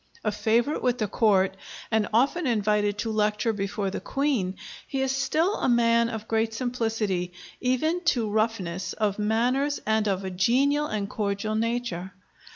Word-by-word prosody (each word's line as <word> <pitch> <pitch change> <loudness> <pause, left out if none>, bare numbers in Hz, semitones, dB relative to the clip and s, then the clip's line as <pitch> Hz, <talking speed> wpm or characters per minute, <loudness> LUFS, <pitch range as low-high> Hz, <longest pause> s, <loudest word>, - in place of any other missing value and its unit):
A 215 - +1
favorite 225 +7 +1
with 250 -1 +1
the 215 -4 -1
Court, 195 -3 +2 0.4
and 220 -2 +2
often 275 +8 +2
invited 210 -2 +1
to 225 +1 -2
lecture 215 +1 +1
before 195 -1 -2
the - - -3
Queen, 265 -10 -1 0.3
he 270 - -2
is 265 - 0
still 310 +9 +1
a - - 0
man 235 -1 +3
of 220 -1 -6
great 225 0 0
simplicity, 225 -7 -1 0.3
even 310 +8 +1
to 240 -9 +2
roughness, 205 -4 -1
of 210 -2 -1
manners, 250 +7 +1
and 220 0 +1
of 195 -1 -1
a 190 - -3
genial 270 +10 +2
and 210 -5 -2
cordial 205 0 -2
nature. 220 -5 -2
220 Hz, 160 wpm, -26 LUFS, 205-250 Hz, 0.4 s, man